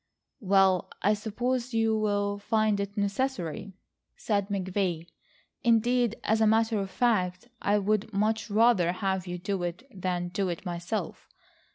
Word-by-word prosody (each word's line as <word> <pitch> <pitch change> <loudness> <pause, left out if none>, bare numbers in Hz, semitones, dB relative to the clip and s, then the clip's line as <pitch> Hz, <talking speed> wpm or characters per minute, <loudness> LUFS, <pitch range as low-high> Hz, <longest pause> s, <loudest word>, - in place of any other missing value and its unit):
"Well, 195 -2 +3
I 210 - +4
suppose 240 +4 -2
you 225 -1 +2
will 205 -1 0
find 215 0 +1
it 200 +1 -4
necessary," 200 - -2 0.4
said 200 -3 0
McVay. 185 -3 -1 0.6
"Indeed, 235 0 +3
as 220 +1 +1
a 220 - +5
matter 220 0 +3
of 195 -1 -3
fact, 190 -3 0
I 205 +1 +2
would 210 +2 0
much 215 +2 0
rather 210 -5 +4
have 190 -1 -2
you 180 0 -4
do 190 +1 -3
it 175 +6 -4
than 180 -2 -2
do 190 +1 -1
it 170 - -5
myself. 175 +2 -4
205 Hz, 145 wpm, -28 LUFS, 185-220 Hz, 0.6 s, a